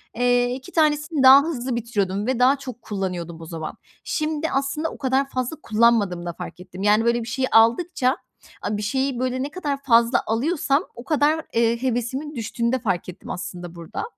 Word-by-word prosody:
eee, 245 +1 +2
2 265 +7 -10
tanesini 305 -2 +1
daha 265 +2 +10
hızlı 260 -6 -3
bitiriyordum 210 -3 -1
ve 260 -2 0
daha 260 +3 +5
çok 255 -3 -9
kullanıyordum 180 -6 -4
o - - -8
zaman. 160 -1 -6 0.3
Şimdi 310 0 -1
aslında 275 +4 -1
o - - -10
kadar 270 0 0
fazla 255 +4 -3
kullanmadığımı 215 -6 +2
da 175 - -4
fark - - -8
ettim. 180 +1 -9
Yani, 210 +2 +4
böyle 235 0 +2
bir - - -9
şeyi 260 +2 -1
aldıkça, 255 +4 +3 0.4
a 210 - -2
bir - - -4
şeyi, 265 +4 -1
böyle, 255 0 -1
ne 285 - -3
kadar 290 -6 -3
fazla 235 -1 +4
alıyorsam 280 +5 +1
o 240 - -9
kadar, 305 +2 +1
eee, 230 0 +2
hevesimin 260 +4 -2
düştüğünü 235 0 -2
de 260 - +1
fark 185 -6 -2
ettim 180 +1 -11
aslında 175 -2 -6
burada. 170 -1 -6
245 Hz, 185 wpm, -23 LUFS, 215-275 Hz, 0.4 s, daha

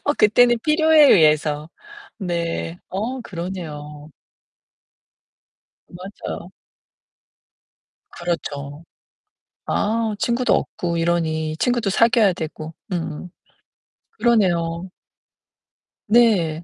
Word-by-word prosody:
어 290 - +2
그때는 240 +3 +4
필요에 310 -1 +5
의해서. 150 -2 +3 0.5
네. 170 - -3
어 230 +7 -4
그러네요. 160 -6 -7 1.8
맞아요. 185 +3 -8 1.6
그렇죠. 145 -4 -5 0.8
아, 220 0 0
친구도 240 +3 +1
없고 170 -1 -2
이러니. 160 -2 -1
친구도 240 -5 0
사귀어야 230 -1 +4
되고. 160 -2 -7 0.2
음. 170 0 -4 0.8
그러네요. 185 -6 +1 1.2
네. 195 -9 +3
175 Hz, 165 characters per minute, -21 LUFS, 160-225 Hz, 1.8 s, 필요에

